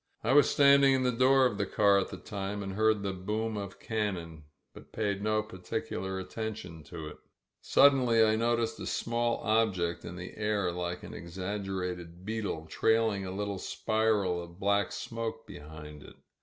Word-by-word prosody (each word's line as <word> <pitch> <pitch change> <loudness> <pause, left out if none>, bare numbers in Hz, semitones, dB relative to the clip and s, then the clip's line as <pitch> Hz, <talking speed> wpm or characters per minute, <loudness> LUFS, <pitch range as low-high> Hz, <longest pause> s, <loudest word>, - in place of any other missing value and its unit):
I - - +2
was 145 +1 +6
standing 140 -1 +6
in 130 - +1
the 125 - +2
door 130 +2 +4
of 115 -5 0
the 100 - +1
car 100 -1 +4
at 95 - -1
the 95 - -7
time 100 +1 -5
and 95 0 -5
heard 110 0 +2
the 100 -1 -1
boom 105 +4 -2
of 100 -2 -6
cannon, 90 -8 -3 0.3
but - - -14
paid 100 -2 -1
no 110 0 +1
par 105 -4 -11
ticular 95 +1 -3
attention 95 -5 -6
to 80 +1 -7
it. 75 - -9 0.4
Suddenly 125 -5 +5
I 110 0 +3
noticed 115 0 0
a - - -5
small 115 0 -1
ob* 110 -2 +2
ject 85 -1 -2
in 85 - -7
the 90 +1 -8
air 105 -4 0
like 90 0 -4
an - - -8
exaggerated 90 -1 -5
beetle, 105 -7 -3
trailing 110 +2 +1
a - - -4
little 100 0 -3
spiral 105 -6 0
of 85 +1 -12
black 100 0 +1
smoke 115 -1 -5
behind 75 -5 -10
it. - - -13
100 Hz, 180 wpm, -30 LUFS, 90-110 Hz, 0.4 s, was